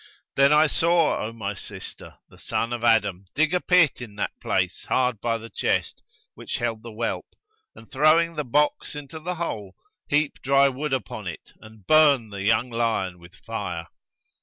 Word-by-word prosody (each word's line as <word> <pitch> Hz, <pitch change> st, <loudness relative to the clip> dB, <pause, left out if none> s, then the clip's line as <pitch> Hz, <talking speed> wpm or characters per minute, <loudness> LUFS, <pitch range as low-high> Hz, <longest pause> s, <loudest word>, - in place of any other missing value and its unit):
Then 140 Hz, +1 st, +5 dB
I 150 Hz, +1 st, +6 dB
saw, 165 Hz, +1 st, +2 dB
O 110 Hz, -, -4 dB
my 105 Hz, -3 st, -4 dB
sister, 95 Hz, -, -10 dB
the -, -, -19 dB
son 115 Hz, +1 st, -2 dB
of 120 Hz, -1 st, -4 dB
Adam 100 Hz, -5 st, +2 dB
dig 155 Hz, +3 st, +2 dB
a 180 Hz, -, +2 dB
pit 175 Hz, -8 st, +4 dB
in 110 Hz, -4 st, -9 dB
that 105 Hz, -, -2 dB
place 90 Hz, -2 st, -1 dB
hard 125 Hz, -4 st, 0 dB
by 115 Hz, -1 st, 0 dB
the 115 Hz, 0 st, -11 dB
chest -, -, -1 dB, 0.3 s
which -, -, -5 dB
held 115 Hz, -2 st, -2 dB
the 115 Hz, -, -9 dB
whelp 115 Hz, +2 st, -3 dB, 0.5 s
and, 115 Hz, -, -15 dB
throwing 155 Hz, +4 st, +4 dB
the 150 Hz, -, -1 dB
box 150 Hz, +3 st, 0 dB
into 145 Hz, +2 st, -8 dB
the 180 Hz, +3 st, -4 dB
hole, 105 Hz, -, -5 dB, 0.3 s
heap 145 Hz, 0 st, 0 dB
dry 140 Hz, +1 st, +4 dB
wood 145 Hz, +3 st, -4 dB
upon 115 Hz, -6 st, -3 dB
it 85 Hz, -, -8 dB
and 110 Hz, -3 st, -16 dB
burn 140 Hz, -7 st, +5 dB
the 100 Hz, -1 st, -6 dB
young 115 Hz, +5 st, +2 dB
lion 110 Hz, -6 st, -1 dB
with 85 Hz, +2 st, -16 dB
fire. -, -, -4 dB
120 Hz, 180 wpm, -24 LUFS, 110-150 Hz, 0.5 s, I